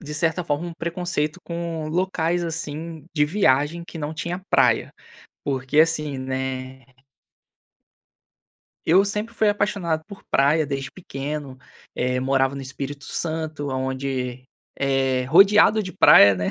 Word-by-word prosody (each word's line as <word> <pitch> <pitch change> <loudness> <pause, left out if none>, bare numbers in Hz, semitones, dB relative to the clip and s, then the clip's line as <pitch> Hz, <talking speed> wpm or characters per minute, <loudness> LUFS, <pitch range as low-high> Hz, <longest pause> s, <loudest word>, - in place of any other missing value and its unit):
de 150 -3 -7
certa 165 +2 0
forma, 155 +2 -2
um 170 - -7
preconceito 170 -1 -3
com 170 -2 -4
locais, 175 0 0
assim, 160 0 -5
de 150 -1 +3
viagem 150 -2 +1
que 170 - -10
não 150 +1 -4
tinha 170 +4 -4
praia, - - +3 0.5
porque, 135 +1 -1
assim, 150 -3 +2
né 130 0 -4 2.0
Eu 185 +5 +5
sempre 210 +3 -3
fui 215 -1 +2
apaixonado 200 -6 -1
por 200 -1 -12
praia 150 +3 +3
desde 135 -1 -4
pequeno, 145 -5 -6 0.4
eh, 125 0 0
morava 135 +1 +1
no 140 - -5
Espírito 140 +2 -6
Santo, 155 -3 -3
aonde 130 -1 -3 0.3
é 135 -2 +1
rodeado 200 +8 +6
de 185 - -6
praia, 100 - +7
né? 90 0 -1
150 Hz, 130 wpm, -23 LUFS, 135-170 Hz, 2.0 s, praia